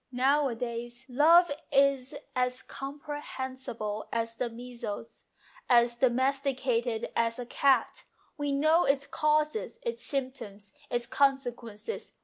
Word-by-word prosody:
Nowadays 245 -2 0
love 330 +6 +6 0.2
is 275 -2 +3 0.2
as 250 0 0
compre 290 +2 -6
hensible 250 -6 -5
as 230 0 -1
the 245 -1 -1
measles, 235 -2 -7 0.4
as 240 -1 +5
domesticated 255 -2 +1
as 230 0 +1
a 245 - -5
cat. 265 0 +2 0.3
We 290 -2 -2
know 310 +5 +4
its 275 0 +2
causes, 305 +10 0
its 470 -1 -3
symptoms, 255 -8 -5 0.2
its 240 0 -1
consequences. 255 - -1
255 Hz, 110 wpm, -29 LUFS, 235-280 Hz, 0.4 s, love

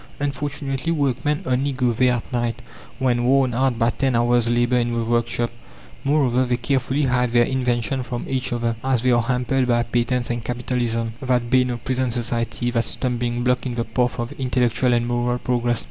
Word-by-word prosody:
Unfortunately 140 0 -2
workmen 145 -1 0
only 130 +2 0
go 125 -2 +1
there 125 +2 +3
at 120 - -6
night 120 -1 -1 0.3
when 125 -2 +1
worn 130 0 +3
out 130 0 +1
by 115 0 +2
ten 135 -1 0
hours' 120 0 +3
labour 120 +1 +2
in 120 0 0
the 115 -1 -1
workshop. 120 +1 0 0.5
Moreover, 135 -3 +2
they 120 -1 0
carefully 135 +3 0
hide 125 -2 +1
their 120 0 +5
inventions 125 -1 -1
from 120 0 -4
each 130 -1 -2
other, 115 -1 -1
as 130 -3 +1
they 130 - +3
are 120 -1 +4
hampered 125 +2 0
by 120 -1 +2
patents 120 +1 0
and 120 -1 -3
Capitalism 120 -2 -2
that 125 -2 0
bane 130 -1 +4
of 120 -1 -5
present 130 -1 0
society, 120 0 -2
that 115 -1 0
stumbling 120 -1 -2
block 125 +1 +1
in 120 - -4
the 115 - 0
path 120 +2 -1
of 120 +2 -3
intellectual 125 -1 +1
and 120 -1 +2
moral 120 0 0
progress. 120 -1 0
125 Hz, 190 wpm, -22 LUFS, 120-130 Hz, 0.5 s, their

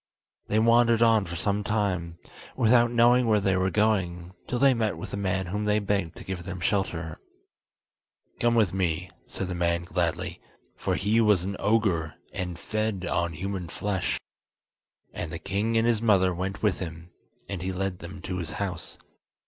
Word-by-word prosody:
They 105 - +1
wandered 115 +1 +5
on 110 -3 +4
for 85 - -6
some 100 +3 0
time, 95 -6 -1 0.4
without 120 +1 +4
knowing 120 +1 +4
where 110 -2 +4
they 95 -1 +1
were 95 0 +2
going, 95 -4 0
till 125 - -1
they 135 +1 +5
met 110 -7 -1
with 80 - -7
a - - 0
man 95 -1 -1
whom 105 +4 -3
they 105 0 +3
begged 100 -5 -1
to - - -10
give 95 -2 -5
them 95 0 -6
shelter. 85 -4 -1 1.2
"Come 120 0 +3
with 105 -7 +3
me," 90 -1 -1 0.2
said 95 - -4
the 90 - -3
man 85 -1 0
gladly, 85 -2 -2 0.3
for - - -1
he 110 +3 +2
was 105 -5 +4
an 100 +1 -3
ogre, 95 -8 +1 0.2
and 90 -2 -4
fed 110 -1 -2
on 85 -1 0
human 95 +2 -4
flesh; 95 +2 -2 0.9
and 80 - -5
the 85 - -4
king 100 +7 -1
and 115 - +3
his 115 -2 +2
mother 95 -5 +4
went 95 +4 -4
with 100 -5 +2
him, 85 -1 -7 0.4
and 100 -3 -4
he 95 +1 -2
led 95 0 -3
them 90 +1 -9
to 90 -1 -3
his 80 -3 -5
house. 95 -4 -4
95 Hz, 180 wpm, -27 LUFS, 90-110 Hz, 1.2 s, wandered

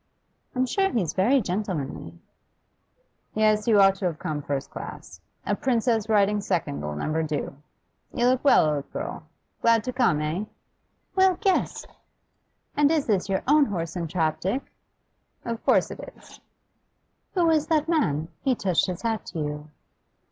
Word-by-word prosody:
'I'm 255 +1 +2
sure 385 +9 +1
he's 195 - -1
very 245 +9 +3
gentlemanly.' 175 - -4 1.2
'Yes, 215 0 +2
you 215 -3 +5
ought 195 -1 +7
to 190 - -4
have 170 -4 -1
come 150 -1 -3
first 140 -1 -4
class. 85 - -9 0.2
A 205 - +1
princess 230 -2 0
riding 205 -1 +3
second'll 75 - -2
never 155 - -1
do. 150 -2 -3 0.6
You 240 - 0
look 255 0 +2
well, 280 - +6
old 145 -2 -2
girl? 310 +4 -6 0.3
Glad 230 -2 +4
to 255 - -4
come, 235 - +2
eh?' 155 +7 -2 0.7
'Well, 380 -2 +4
guess! 390 -4 0 0.9
And 290 0 +4
is 310 -3 +1
this 200 -3 0
your 190 -1 0
own 295 +1 +5
horse 170 - -4
and 170 -3 -3
trap, 160 -2 0
Dick?' 195 - -3 0.7
'Of 230 0 -4
course - - +3
it - - -8 0.2
is.' - - -16 1.0
'Who 355 -2 +3
was 315 -2 +3
that 310 -1 +1
man? 160 - +1
He 260 -2 +1
touched 190 -6 +1
his 180 +2 -5
hat 225 -2 -1
to - - -7
you. 150 0 -4
205 Hz, 155 wpm, -25 LUFS, 160-255 Hz, 1.2 s, ought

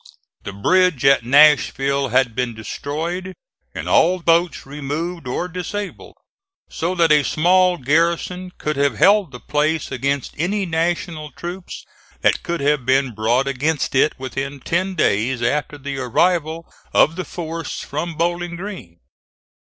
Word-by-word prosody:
The 100 - -6
bridge 155 - +2
at 135 -3 +5
Nashville 140 0 +4
had 125 -1 +2
been 125 -1 -2
destroyed 165 - -5 0.4
and - - -5
all 180 +3 +4
boats 170 -1 +1
removed 150 +4 -5
or 150 +8 -2
disabled, 185 +3 -6 0.6
so 175 +3 -2
that 165 -3 +3
a 150 -1 +6
small 180 +4 +3
garrison 170 +6 0
could 150 -1 -3
have 140 0 +1
held 200 -5 +4
the 125 - -9
place 155 +3 -1
against 140 +1 -2
any 195 +4 0
National 165 -2 -2
troops 175 +6 -8 0.4
that - - +2
could 170 -3 -3
have 145 -1 +1
been 130 0 +2
brought 115 +5 +1
against 140 +3 -1
it 135 +3 +2
within 135 +1 -5
ten 185 +7 -1
days 120 - +1
after 145 +4 -1
the 140 0 -5
arrival 160 +5 0 0.3
of 160 - +4
the 185 - -3
force 165 -2 -5
from 160 +3 -4
Bowling 175 +1 -1
Green. 195 +3 -8
155 Hz, 140 wpm, -20 LUFS, 135-175 Hz, 0.6 s, a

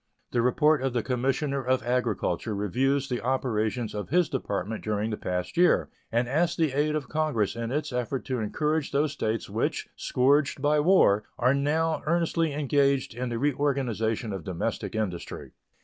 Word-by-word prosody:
The 120 - +2
report 150 +4 +3
of 135 -2 -1
the 120 -3 0
Commissioner 135 +2 -1
of 130 0 +1
Agriculture 115 -4 -1
reviews 130 +7 0
the 125 -2 -2
operations 120 -3 -1
of 105 -1 -5
his 175 +3 +3
Department 110 - -3
during 105 +1 -1
the - - -1
past 90 - -4
year, 180 0 +4 0.2
and 120 +1 +1
asks 160 +6 +1
the 160 -4 +1
aid 150 +3 +1
of 145 -4 -3
Congress 150 -11 0
in 115 0 -3
its 145 -1 -2
efforts 125 +2 -2
to 130 -2 0
encourage 150 +7 -1
those 145 +1 +2
States 110 -5 -2
which, - - -2
scourged 140 +3 +2
by 150 +2 +2
war, 145 - +4
are 125 +2 +3
now 155 +3 +1
earnestly 165 -1 +1
engaged 140 -2 +1
in 125 +1 -3
the 120 - -2
reorganization 125 -6 0
of 95 -4 -5
domestic 90 +4 -3
industry. 95 -6 -4
130 Hz, 165 wpm, -27 LUFS, 115-145 Hz, 0.2 s, year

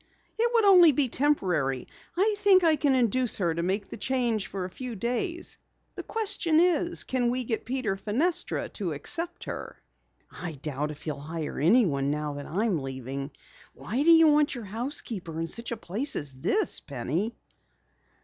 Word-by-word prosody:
"It 470 +1 +1
would 460 -3 +3
only 360 -5 +8
be 270 -2 +1
temporary. 180 - 0 0.3
I 420 +4 +3
think 395 -3 +5
I 320 -2 +5
can 285 -2 +2
induce 250 0 +2
her 170 -4 0
to 170 - -2
make 195 +3 -1
the - - -7
change 240 -6 0
for 190 -2 -4
a - - -6
few 250 +1 -6
days. 250 - -2 0.3
The - - -6
question 395 -7 0
is, 345 0 +2
can 250 -2 0
we 250 +1 -1
get 225 -2 -3
Peter 255 -5 -1
Fenestra 255 - -1
to - - -3
accept 345 +1 -3
her?" - - -7 0.5
"I 175 -3 -6
doubt 145 +1 -3
if 150 - -9
he'll 150 -3 -4
hire 155 +1 -5
anyone 155 - +3
now 150 0 -2
that 145 0 -7
I 200 +8 -1
am 185 -10 0
leaving. 135 +1 -5 0.5
Why 240 +7 -3
do 320 - +3
you 325 -1 +8
want 295 -1 +3
your 235 -3 -7
housekeeper 210 - -4
in 165 - -1
such 235 +8 -4
a 235 - -2
place 225 +9 -1
as 145 -3 -2
this, 400 - +1
Penny?" 155 - -3
230 Hz, 180 wpm, -27 LUFS, -, 0.5 s, only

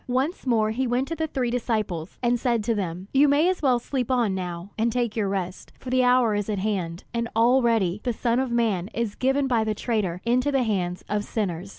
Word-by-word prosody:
Once 265 +5 -1
more 220 -3 +2
he 255 +3 -1
went 250 +3 0
to 330 - -3
the 320 -1 -2
three 255 -5 -1
disciples, 215 -9 -2
and 240 0 +2
said 235 -3 +1
to 230 +2 +1
them: 185 -2 -4
"You 280 +2 +5
may 290 +4 +4
as 370 0 0
well 260 -4 +3
sleep 250 0 -3
on 240 -6 +2
now, 180 0 -5
and 230 +1 +1
take 240 -2 -1
your 210 -4 0
rest, 185 -2 -4
for 255 - -8
the 255 0 +3
hour 250 -3 +4
is 205 0 -2
at 210 - -1
hand; 185 -4 -2
and 235 -1 -1
already 230 -5 +3
the 245 - 0
Son 235 +1 0
of 265 -1 0
man 220 -7 +1
is 230 -3 -1
given 270 +4 +1
by 240 -4 +2
the 215 -1 -1
traitor 205 -6 -1
into 250 +4 +2
the 270 -2 +2
hands 185 -5 -2
of 210 0 -1
sinners. 195 -4 -3
230 Hz, 230 wpm, -25 LUFS, 200-250 Hz, -, You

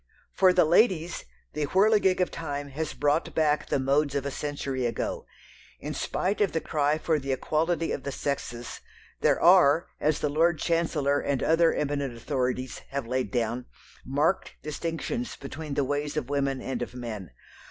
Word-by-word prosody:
For 185 -1 +5
the 180 -2 +4
ladies, 175 -1 +2 0.3
the 150 -1 -1
whirligig 195 +1 +4
of 180 - +1
time 145 -3 -4
has 155 +3 -4
brought 145 +2 0
back 150 -1 +1
the - - +2
modes 140 +2 +1
of 140 -1 -1
a 140 - -2
century 135 -3 -2
ago. 115 - -3 0.5
In - - -5
spite 200 +3 -1
of 200 - +2
the 160 - +1
cry 150 -1 +1
for 155 -1 0
the 135 0 -3
equality 165 +5 0
of - - -2
the 140 - -4
sexes, 130 -4 -4 0.4
there - - +3
are, 170 -3 +5
as 155 0 +2
the - - -1
Lord 160 +3 +2
Chancellor 155 -5 +1
and 140 -3 -1
other 165 +1 +4
eminent 140 -4 -2
authorities 130 0 -2
have 135 -1 -3
laid 125 -1 -1
down, 120 +2 -2 0.4
marked 145 +7 0
distinctions 165 +10 -3
between 145 +1 -6
the 145 - +2
ways 145 +2 -2
of 140 -2 -3
women 140 -2 0
and 135 - -3
of 120 0 -5
men. 110 -7 -6
145 Hz, 170 wpm, -27 LUFS, 135-165 Hz, 0.5 s, For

